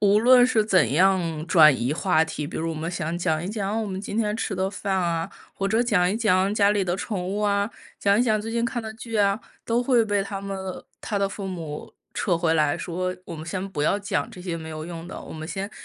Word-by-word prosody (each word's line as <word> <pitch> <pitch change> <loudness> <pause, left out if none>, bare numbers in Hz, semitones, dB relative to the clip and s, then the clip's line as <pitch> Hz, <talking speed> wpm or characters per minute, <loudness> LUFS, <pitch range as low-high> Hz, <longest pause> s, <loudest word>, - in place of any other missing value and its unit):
无 205 0 +5
论 250 +2 +7
是 220 -4 +2
怎 180 - +3
样 170 -2 +2
转 160 -4 +7
移 125 +3 -1
话 160 -1 +2
题， 150 -2 -5
比 - - -7
如 165 +1 -2
我 - - -4
们 160 +2 -3
想 170 -1 -3
讲 160 -2 0
一 180 - -4
讲 210 +1 -2
我 - - -3
们 190 -1 -4
今 205 +1 -5
天 215 -1 0
吃 215 - -2
的 190 +1 -1
饭 200 -1 -2
啊， 170 -2 -1 0.2
或 195 - -2
者 220 +4 +2
讲 185 -7 +2
一 210 - -1
讲 195 -3 +2
家 205 -1 +4
里 205 -2 +1
的 175 +1 -1
宠 195 -3 -3
物 200 +3 -2
啊， 200 +1 +1 0.3
讲 200 +1 +3
一 - - +4
讲 215 -3 +2
最 225 - -5
近 235 +1 0
看 235 0 -2
的 220 0 -6
剧 225 -1 -5
啊， 200 +1 +2 0.2
都 235 +2 +1
会 245 -3 +3
被 205 -2 +1
他 195 0 -5
们 195 0 -5
的 190 -1 -6 0.2
他 205 -3 -2
的 195 0 +1
父 195 0 -6
母 165 -5 -6 0.2
撤 175 -3 +1
回 165 -1 +1
来 150 -2 +2
说 185 +1 -3
“我 170 - -7
们 155 - -7
先 185 +3 -3
不 145 -5 -2
要 200 - +2
讲 205 - -2
这 180 - -11
些 175 -3 -3
没 160 -1 -8
有 155 0 -6
用 170 0 -7
的， - - -7
我 - - -9
们 155 0 -6
先 195 +2 -4
190 Hz, 280 characters per minute, -25 LUFS, 170-210 Hz, 0.3 s, 论